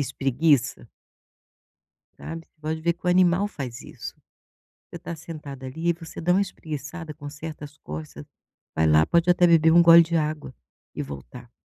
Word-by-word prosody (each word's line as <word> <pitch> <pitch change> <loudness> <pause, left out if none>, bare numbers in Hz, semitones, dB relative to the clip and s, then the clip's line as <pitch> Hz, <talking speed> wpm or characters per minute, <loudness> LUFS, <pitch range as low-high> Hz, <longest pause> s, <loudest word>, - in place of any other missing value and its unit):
espreguiça 135 +1 +1 1.3
sabe? 165 0 -8
Você - - -50
pode 160 +1 -3
ver 170 +1 +1
que 180 - -11
o - - +4
animal 180 +2 +3
faz 130 - -7
isso, - - -9 0.7
você - - -9
está 170 - -6
sentada 150 -5 -9
ali 160 +6 -4
e - - +4
você 165 -1 -10
dá 175 +2 +2
uma 195 - +3
espreguiçada, 155 -3 -6
conserta 150 +1 -8
as 145 0 -12
costas, 75 -1 -8 0.5
vai 80 0 +2
lá 80 0 +5
pode 170 +1 +2
até 175 0 +5
beber 165 -1 +5
um 170 0 +7
gole 170 0 +9
de 165 +1 -1
água, 150 -4 -2 0.4
e - - -3
voltar 70 -4 -10
160 Hz, 170 wpm, -25 LUFS, 140-170 Hz, 1.3 s, gole